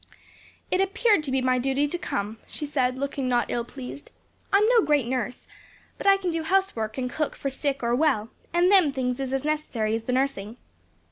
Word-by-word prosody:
"It 370 - +3
appeared 390 0 +3
to 270 - -3
be 265 0 +1
my 255 0 +2
duty 270 +3 +1
to 350 - -2
come," 210 -3 -3
she 300 - -5
said, 260 -3 0
looking 275 -1 -2
not 245 -1 +1
ill 240 - -1
pleased; 265 +3 -9 0.4
"I'm 405 +2 +5
no 480 -2 +6
great 295 - +2
nurse, 250 0 -3 0.5
but - - -3
I 395 0 +7
can 370 -3 -2
do 330 0 -1
housework 320 - 0
and 255 -1 -1
cook 300 +4 -2
for 275 - -3
sick 275 -1 -2
or 235 0 +1
well; 250 -6 +2 0.2
and 350 +2 +3
them 370 -7 +6
things 250 -1 -2
is 265 -1 -3
as 270 +1 -1
necessary 280 -8 -1
as 225 0 -2
the 250 - -1
nursing." 250 -5 -1
270 Hz, 205 wpm, -26 LUFS, 250-315 Hz, 0.5 s, I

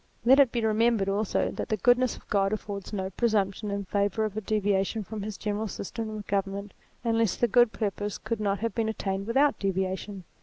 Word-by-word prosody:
Let 265 +3 +7
it 270 -4 +6
be 235 -2 0
remembered 220 -2 +2
also 205 +1 0
that - - -5
the 215 - +1
goodness 245 +4 +3
of - - -17
God 195 0 +1
affords 200 -2 -5
no 190 -2 -3
presumption 210 -1 0
in 200 0 -3
favour 205 +3 0
of 210 -2 -4
a 215 - -2
deviation 205 0 0
from 215 +1 -6
his 210 0 -5
general 210 +1 -2
system 220 +3 -5
of 215 -1 -6
government 200 0 -2 0.3
unless 225 -4 +2
the 240 - +2
good 240 +1 +5
purpose 205 -2 -3
could 230 -2 -3
not 200 -1 0
have 230 -2 -1
been 225 0 0
attained 195 -2 -3
without 275 +5 +3
deviation. 190 0 -2
210 Hz, 200 wpm, -28 LUFS, 195-225 Hz, 0.3 s, Let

